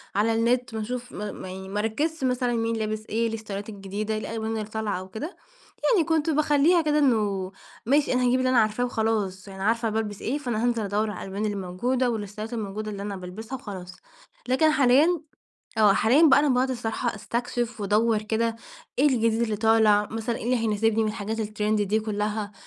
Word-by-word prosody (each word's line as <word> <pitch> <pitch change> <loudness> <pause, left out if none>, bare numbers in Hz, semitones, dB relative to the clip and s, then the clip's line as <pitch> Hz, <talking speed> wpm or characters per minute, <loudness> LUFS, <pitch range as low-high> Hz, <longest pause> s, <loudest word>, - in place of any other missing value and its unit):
على 215 +3 +2
النت 235 +1 +1
ما 220 - -2
أشوف 245 +2 -5
م - - -8 0.2
م - - -7
يعني 190 +1 -7
ما 205 +2 -2
أركزش 285 +9 -1
مثلًا 250 -1 +1
مين 230 0 0
لابس 215 -1 -3
إيه، - - -4
إيه 225 - -4
الستايلات 205 -1 -6
الجديدة، 205 +1 -4
إيه 215 - -1
الألوان 220 0 -3
اللي 220 -1 -2
طالعة 215 -3 -3
أو 185 0 -9
كده، 240 - -6 0.6
يعني 355 -8 +3
كنت 320 -1 +1
باخليها 305 +3 +4
كده 300 -1 +2
إنه 205 -8 +1 0.3
ماشي 280 +4 +3
أنا 250 0 +2
هاجيب 250 +1 +3
اللي 255 0 +1
أنا 255 -2 +4
عارفاه 215 +3 +1
وخلاص، 215 -5 -1
يعني 190 -1 -7
عارفة 230 +2 +1
أنا 215 - -3
بالبس 210 -2 -2
إيه، 265 +5 -1
فأنا 240 -6 -2
هانزل 240 -2 +1
أدور 210 +2 0
على 185 - -7
الألوان 200 +3 -2
اللي 205 -1 -1
موجودة 240 +8 0
و 235 - 0
الستايلات 210 +2 -6
الموجودة 215 -1 -4
اللي 200 -1 -6
أنا 200 0 -4
بالبسها 195 +7 -7
وخلاص. 185 -7 -8 0.5
لكن 265 +5 +4
حاليًا، 295 +5 +4 0.6
آه 210 -2 +6
حاليًا 240 +10 +4
بقى 275 0 +6
أنا 295 - +2
باقعد 255 0 +2
الصراحة 235 -1 -2
أستكشف 235 +1 -3
وأدور 215 +2 +2
كده، 225 +1 0 0.4
إيه 280 - +5
الجديد 230 -3 +1
اللي 220 -2 0
طالع، 220 -1 +4
مثلًا 225 +1 -2
إيه - - -7
اللي 250 +2 +2
هيناسبني 225 0 +1
من - - 0
الحاجات 215 +1 -3
الترند 210 0 0
دي 210 +2 +1
كلها، 210 -1 -2
220 Hz, 205 wpm, -26 LUFS, 210-245 Hz, 0.6 s, آه